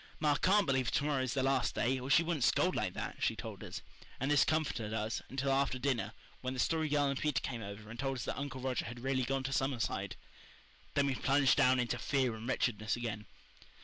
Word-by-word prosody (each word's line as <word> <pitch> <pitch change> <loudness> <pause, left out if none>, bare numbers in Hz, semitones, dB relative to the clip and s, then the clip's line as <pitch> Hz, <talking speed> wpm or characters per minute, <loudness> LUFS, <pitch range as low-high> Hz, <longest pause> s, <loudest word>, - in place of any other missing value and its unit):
"Ma 150 -2 +3
can't 195 +7 +4
believe 130 -4 +1
to 140 - +1
morrow 145 -3 +1
is 130 0 -2
the 130 - +1
last 135 -2 +1
day, 130 +2 +1
or 130 +2 -6
she 165 - +6
wouldn't 165 -5 -1
scold - - +3
like - - -1
that," - - -4
she - - +1
told - - -7
us; - - -7 0.4
and 135 +3 0
this 145 - +6
comforted 135 -9 -1
us 110 +1 -2
until 135 +1 -1
after 135 -1 +2
dinner, 130 -2 -1 0.3
when 130 0 -3
the - - -5
Story 160 +3 +1
Girl 145 0 +3
and 140 -1 0
Peter 150 -3 +1
came 120 -3 -4
over 100 +1 -8
and 115 +2 -9
told 135 0 -1
us 120 - -4
that - - -2
Uncle 140 -2 -5
Roger 130 -2 -1
had 120 +1 -7
really 130 0 0
gone 135 +1 -1
to 135 0 -2
Summerside. 120 -8 -1 0.8
Then 145 - +3
we 140 - +1
plunged 135 +1 +3
down 130 0 +4
into 120 0 -1
fear 130 -4 +1
and 110 +3 -6
wretchedness 110 -4 0
again. 110 -4 -4
130 Hz, 230 wpm, -34 LUFS, 120-140 Hz, 0.8 s, she